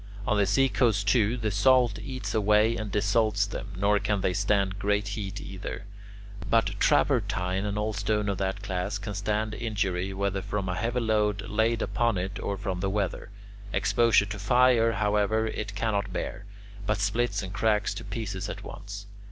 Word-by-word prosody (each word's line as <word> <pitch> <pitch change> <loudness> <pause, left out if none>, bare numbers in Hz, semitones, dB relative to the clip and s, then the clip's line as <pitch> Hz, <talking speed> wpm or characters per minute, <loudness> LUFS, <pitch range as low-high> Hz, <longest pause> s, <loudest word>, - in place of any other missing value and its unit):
On - - +1
the 100 -1 +2
seacoast, 115 -3 +2
too, 110 +2 +3
the 110 -3 -1
salt 125 +1 +3
eats 130 -1 -5
away 105 +1 +3
and 110 -2 -4
dissolves 105 0 +2
them, 100 0 -6
nor 100 +2 +3
can 105 -1 0
they 90 - +1
stand 100 0 +1
great 105 0 0
heat 100 -1 -4
either. 95 +1 -7 0.6
But 115 0 +2
travertine 90 +2 +2
and 105 0 -2
all 105 +1 -1
stone 105 +1 0
of 100 -2 -1
that 95 +1 -2
class 100 0 -2
can 105 0 -6
stand 105 +2 -1
injury 95 -5 -2
whether 95 0 -1
from 100 0 -3
a - - 0
heavy 115 +5 -1
load 105 -2 +1
laid 110 +2 +1
upon 115 -4 0
it 95 +3 -3
or 100 - -3
from 95 -2 -3
the 95 +1 -1
weather; 100 -1 -2 0.4
exposure 115 -2 +3
to 105 0 -6
fire, 115 +2 +4
however, 105 +1 +1
it 105 -2 -4
cannot 100 -1 -1
bear, 100 - -4 0.4
but 105 - +1
splits 100 +1 0
and 95 0 -6
cracks 105 -1 +1
to - - -7
pieces 100 -2 -4
at - - -6
once. 100 0 -8
105 Hz, 175 wpm, -27 LUFS, 100-110 Hz, 0.6 s, fire